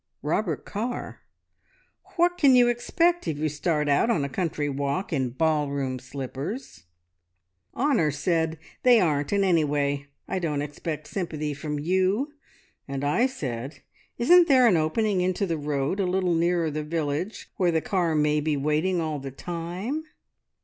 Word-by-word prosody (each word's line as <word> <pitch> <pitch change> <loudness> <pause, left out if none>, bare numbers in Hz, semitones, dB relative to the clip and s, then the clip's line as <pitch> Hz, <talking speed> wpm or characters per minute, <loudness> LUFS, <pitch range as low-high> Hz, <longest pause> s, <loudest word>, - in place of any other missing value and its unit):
"Robert 160 +1 -1
Carr. 235 +4 -4 1.0
`What 350 +1 +3
can 280 -6 +5
you 245 -1 +6
expect 335 - +1
if 155 -3 -1
you 155 +1 0
start 150 0 -1
out 145 +10 +3
on 165 -11 +2
a - - -4
country 150 0 -2
walk 140 +6 -2
in 130 -4 0
ball 150 +2 +1
room 135 -2 -2
slippers?' 135 - -6 0.9
"Honor 245 - +2
said: 160 +2 0 0.3
`They 245 -2 +7
aren't, 150 -6 +1
and, 200 -1 +2
anyway, 145 -5 +1 0.2
I 190 - -2
don't 150 -5 -1
expect 150 +1 -5
sympathy 155 -6 -3
from 150 +1 -4
you,' 190 - +1 0.5
and 140 0 -4
I 155 - +3
said: 135 - -6 0.4
`Isn't 345 +8 +6
there 260 -4 +6
an 215 -6 +5
opening 185 +5 +1
into 185 +2 0
the 165 -4 -2
road 145 +4 -1
a 190 - +1
little 180 -1 +1
nearer 170 -1 +1
the 155 +1 -3
village 160 +4 -3
where 180 -3 +3
the 165 - +2
car 170 -2 0
may 150 0 +2
be 150 -1 0
waiting 155 +6 +1
all 155 -3 -2
the 135 0 -6
time?' 175 - -4
160 Hz, 155 wpm, -26 LUFS, 145-195 Hz, 1.0 s, `They